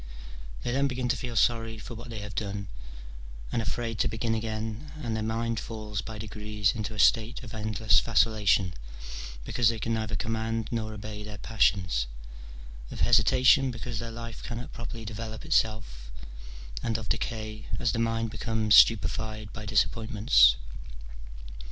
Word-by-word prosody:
They 120 - -1
then 140 +2 +2
begin 125 -2 -2
to 125 - +3
feel 125 -2 -5
sorry 115 -1 +2
for 110 +2 -8
what 120 +2 -9
they 110 -3 -5
have 105 0 -7
done, 100 -2 -3 0.8
and 115 - 0
afraid 115 0 -3
to - - +3
begin 115 +1 -1
again, 110 +4 -4
and 115 -2 -1
their 110 - -1
mind 115 +1 -1
falls 105 -2 -5
by 110 0 -7
degrees 105 -1 -1
into 110 0 -4
a - - -7
state 115 +5 +3
of 110 - -9
endless 105 -4 +3
vacillation, 105 -5 +3 0.7
because 120 -3 +3
they 115 - -1
can 115 +2 -1
neither 110 -1 -2
command 115 -1 -2
nor 110 -2 -2
obey 105 0 -7
their 105 0 -7
passions, 95 - +1 0.8
of - - -6
hesitation, 125 +3 +5
because 120 -1 -5
their 115 +1 -5
life 115 -1 -7
cannot 120 +1 -6
properly 115 -1 -7
develope 110 +3 -6
itself, 110 - 0 0.7
and 115 -1 0
of 110 -2 -7
decay, 110 -1 -3
as 115 - +1
the 115 - -2
mind 115 -1 0
becomes 110 -2 0
stupefied 110 0 +4
by 105 -1 -7
disappointments. 105 - +4
110 Hz, 155 wpm, -28 LUFS, 105-115 Hz, 0.8 s, hesitation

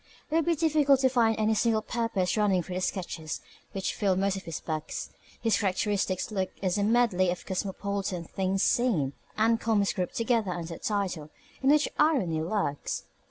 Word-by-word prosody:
It - - +1
would 330 - +3
be 340 - +3
difficult 295 -3 +3
to 260 - +4
find 230 -3 +3
any 215 0 +2
single 220 0 +2
purpose 225 -7 -1
running 200 -4 +2
through 185 - -7
the 185 - -2
sketches 165 -5 -3 0.3
which 195 -1 -2
fill 195 -2 +1
most 195 +1 +1
of 190 - -7
his 165 -3 -4
books. 155 -2 -4 0.3
His 225 -2 +2
characteristic 195 -1 0
book 190 -3 -1
is 190 +1 0
a - - +2
medley 215 -5 +3
of 175 0 -3
cosmopolitan 195 -1 -3
"things 190 +3 -1
seen" 185 - +2 0.2
and 225 +1 +3
comments 210 -3 +2
grouped 185 -3 -3
together 230 -3 +1
under 170 -1 -5
a - - -9
title 185 -7 -2 0.3
in 270 - +3
which 300 +1 +5
irony 240 - +2
lurks. 165 -4 -2
200 Hz, 180 wpm, -28 LUFS, 185-230 Hz, 0.3 s, which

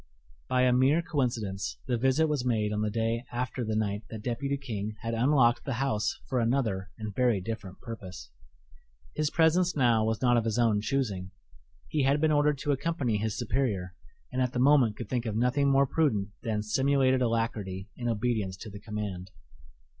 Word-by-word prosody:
By 130 0 +3
a 125 -1 +4
mere 135 +7 +3
coincidence, 105 - -2
the 125 - 0
visit 130 +6 +2
was 150 -5 -1
made 110 -4 0
on 105 - -1
the 105 - 0
day 115 +2 -1
after 125 +1 -3
the 110 -1 -2
night 105 -1 -1
that 110 -2 -7
Deputy 140 +3 -2
King 110 -6 -5
had 115 -1 -3
unlocked 120 0 +3
the 135 - -3
house 120 -4 -1
for 130 - 0
another 115 -6 0
and 110 -2 -5
very 120 -2 +2
different 100 -1 -6
purpose. 90 - -8 0.8
His 155 -1 0
presence 170 +3 +3
now 120 -5 +3
was 110 0 0
not 120 -1 +3
of 115 - +1
his 110 -1 -1
own 115 -4 +3
choosing: 105 -7 -2 0.6
he 155 - 0
had 140 +2 +3
been 155 +1 +2
ordered 145 -1 +3
to 145 - +1
accompany 140 -5 0
his 105 0 -2
superior, 110 -7 -1 0.4
and 130 - -1
at 125 -1 0
the 125 - -1
moment 130 -5 +4
could 120 - -6
think 120 0 -2
of 105 - -2
nothing 125 +5 +2
more 135 0 +4
prudent 120 -9 +1
than 110 -3 -2
simulated 130 +3 +2
alacrity 110 -5 -1
in 120 -1 -3
obedience 110 -4 -1
to 110 +2 -9
the 100 - -9
command. 105 -4 -5
120 Hz, 185 wpm, -29 LUFS, 105-135 Hz, 0.8 s, a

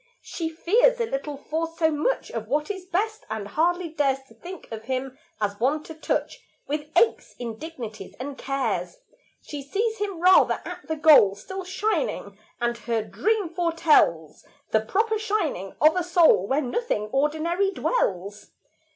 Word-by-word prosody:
She 330 -2 -4
fears 455 +10 +3
a 470 - +1
little 285 -5 -4
for 320 +3 -2
so 320 -1 +3
much 310 +12 -1
Of 225 -2 -5
what 300 - 0
is 380 -2 -7
best, 430 +5 -1
and 220 -2 -4
hardly 345 - 0
dares 275 -4 0
To - - -17
think 360 0 -10
of 220 0 -7
him 260 +1 -3 0.2
as 205 -1 -2
one 285 +6 +1
to 320 - -9
touch 315 - -2 0.2
With 295 +1 -3
aches, 455 +5 +2
indignities, 235 -2 -7
and 275 +2 -5
cares; 275 - -2 0.5
She 290 -2 -6
sees 435 +10 -2
him 400 -4 -3
rather 365 +2 +5
at - - -8
the 315 - -1
goal, 295 -11 +6
Still 380 - -7
shining; 375 - -2 0.2
and 235 0 -1
her 230 -2 -1
dream 415 - 0
foretells 330 - +2 0.3
The 220 - +3
proper 435 - 0
shining 395 - -2
of 310 +2 +5
a 360 - +1
soul 335 - +4
Where 275 +6 +1
nothing 245 - -2
ordinary 315 +7 +1
dwells. 205 - -2
310 Hz, 160 wpm, -25 LUFS, 245-370 Hz, 0.5 s, goal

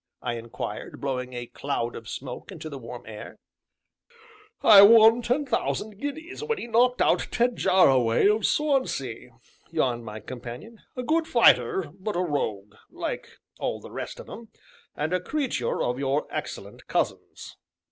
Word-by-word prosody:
I 120 - -1
inquired, 115 +1 -6
blowing 130 -2 -3
a 120 0 -5
cloud 120 -1 -3
of 115 -1 -9
smoke 130 +7 -7
into 160 -4 -8
the 140 - -6
warm 120 0 -9
air. 105 -1 -9 1.3
"I 205 -3 +10
won 225 +3 +8
ten 250 +5 0
thousand 215 -4 -2
guineas 315 - -6
when 455 0 -1
he - - -5
knocked 245 +2 +3
out - - +2
Ted 240 0 +1
Jarraway 130 - +4
of 210 0 +2
Swansea," 260 - -1 0.4
yawned 125 -8 0
my 110 -1 -7
companion; 125 - -9 0.2
"a 250 - -2
good 320 +4 +1
fighter, 155 - +4
but 205 +2 -3
a - - 0
rogue 105 - -3 0.2
like - - -5 0.3
all - - -2
the - - -12
rest - - -6
of - - -10
'em, 230 0 -10 0.5
and 155 +4 -2
a 185 - +2
creature 255 - -1
of 125 +1 -1
your 140 +2 0
excellent - - -7
cousin's." - - -3
160 Hz, 155 wpm, -26 LUFS, -, 1.3 s, I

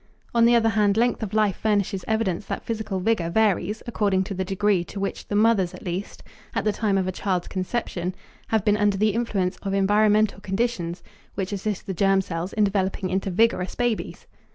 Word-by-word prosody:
On 235 -1 +5
the 240 +1 +5
other 225 -1 +4
hand, 210 -1 +2
length 240 +1 +2
of 215 -3 -3
life 210 -3 +2
furnishes 200 -3 0
evidence 215 -4 -1
that - - -4
physical 220 -4 -3
vigor 185 -4 +1
varies 210 +1 +1
according 200 -5 +1
to 195 - -5
the 190 0 -2
degree 195 -1 +1
to 200 - -7
which 195 - -4
the 205 - -2
mothers 205 -4 +3
at - - -12
least, 180 +3 -5 0.3
at - - 0
the 215 - +3
time 205 -2 0
of 190 -1 0
a - - 0
child's 185 -1 -2
conception, 185 -2 -3 0.3
have 220 -3 0
been 210 0 +3
under 205 -1 +2
the 215 +1 +2
influence 200 -5 -1
of 195 -1 -3
environmental 210 +1 +3
conditions 195 -4 -2 0.3
which 195 0 -3
assist 200 0 -3
the 190 - -3
germ 195 +2 +3
cells 180 -1 -3
in 215 - +2
developing 195 -2 0
into 190 +1 -1
vigorous 190 -1 +1
babies. 240 -3 -2
200 Hz, 200 wpm, -24 LUFS, 190-215 Hz, 0.3 s, On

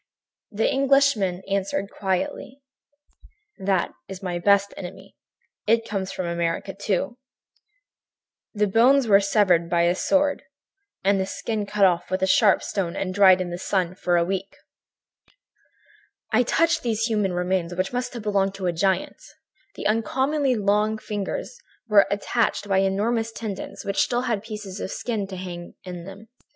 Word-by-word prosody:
"The 215 +2 0
Englishman 270 -9 +2
answered 195 0 -2
quietly: 255 +7 -3 1.0
"'That 190 -2 0 0.2
is 190 0 -9
my 175 -2 -2
best 200 +2 +3
enemy. 190 +1 -9 0.5
It 230 +1 +2
comes 195 -2 -3
from 185 - -4
America, 170 +2 -2
too. 200 +5 -2 1.3
The 210 -1 +1
bones 240 +6 +4
were 200 -2 +7
severed 195 -4 +2
by 170 0 +2
a 170 +1 +3
sword 285 +9 +1 0.6
and 195 0 +3
the 190 - -1
skin 210 +1 -3
cut 205 -1 +3
off 175 -2 +1
with 185 +1 -1
a - - +5
sharp 200 +1 +4
stone 180 -4 -2
and 185 -1 -3
dried 190 -1 +6
in 175 -1 -4
the 175 - -5
sun 185 -2 -1
for 175 -1 0
a 170 - +2
week.' 195 +1 -4 1.8
"I 220 - +5
touched 330 +7 +2
these 225 -2 -1
human 210 -5 0
remains, 180 -1 -1
which 185 +5 -2
must 250 0 -3
have 235 - -6
belonged 195 -2 +1
to 195 - -5
a 175 - +1
giant. 190 - 0 0.5
The - - -7
uncommonly 260 +6 +1
long 210 +1 +1
fingers 210 - -5 0.3
were 210 -2 +5
attached 205 +1 0
by 195 -1 +2
enormous 220 +4 0
tendons 215 -4 -6
which 200 -1 +1
still 245 0 +1
had 230 -5 -1
pieces 210 -3 -7
of - - -4
skin 215 -3 -3
hanging 180 -2 -7
to 180 - -6
them - - -5
in 175 - -8
places. 195 +3 -11
200 Hz, 160 wpm, -24 LUFS, 185-225 Hz, 1.8 s, were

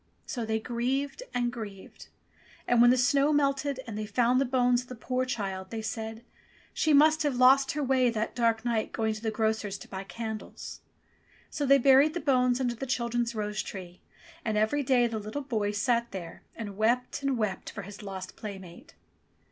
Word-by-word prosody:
So 240 -6 -4
they 220 0 0
grieved 265 - -2
and 240 0 -1
grieved. 205 -5 -9 0.6
And 240 -1 +4
when 240 - +8
the 255 - +5
snow 275 +4 +3
melted 280 -2 +1
and 225 -3 -6
they 215 0 -4
found 245 +4 +2
the - - +2
bones 245 -1 +2
of 250 - -14
the 250 - -8
poor 255 +3 -2
child, 195 -6 -4
they 225 -1 -5
said, 225 +1 -5 0.5
She 315 - +1
must 310 +2 +5
have 290 -4 +1
lost 265 +2 +5
her 295 0 -1
way 260 -2 +3
that 220 -1 -2
dark 230 -1 +1
night 230 -2 -1
going 220 -1 0
to 215 - -8
the 225 - -1
grocer's 220 -2 -1
to - - -12
buy 190 0 -6
candles." 220 +1 -7 0.7
So 285 - -2
they 275 +1 +7
buried 275 +4 +5
the - - 0
bones 250 -4 +2
under 245 -2 0
the 270 +3 -6
chil 240 -2 -1
dren's 235 0 -1
rose 210 0 -2
tree, 180 -2 -9 0.4
and 220 -2 -1
every 220 +8 +2
day 255 -2 +3
the 230 -2 -2
little 215 +8 -5
boy 220 -6 -1
sate 235 +3 +1
there 175 -3 -8
and 205 -4 -7
wept 240 +5 +1
and 275 -2 0
wept 210 -4 -2
for 200 - -7
his 200 +3 -10
lost 190 -2 -7
playmate. 190 - -9
235 Hz, 195 wpm, -29 LUFS, 215-260 Hz, 0.7 s, when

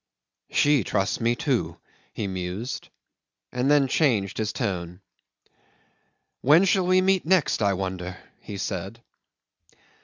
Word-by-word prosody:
"She 145 -5 +3
trusts 100 +3 -1
me, 120 +1 +2
too," - - -1 0.3
he - - -4
mused, 95 +5 -5 0.6
and 125 +2 0
then 145 -2 +4
changed 115 - +1
his 110 0 -1
tone. 90 -2 -3 1.4
"When 155 +8 +5
shall 190 -2 +2
we 185 0 +4
meet 190 0 +2
next, 175 -7 +2
I 100 -1 +3
wonder?" 95 -1 -4 0.2
he 100 - -8
said. 100 +4 -5
115 Hz, 120 wpm, -25 LUFS, 95-145 Hz, 1.4 s, When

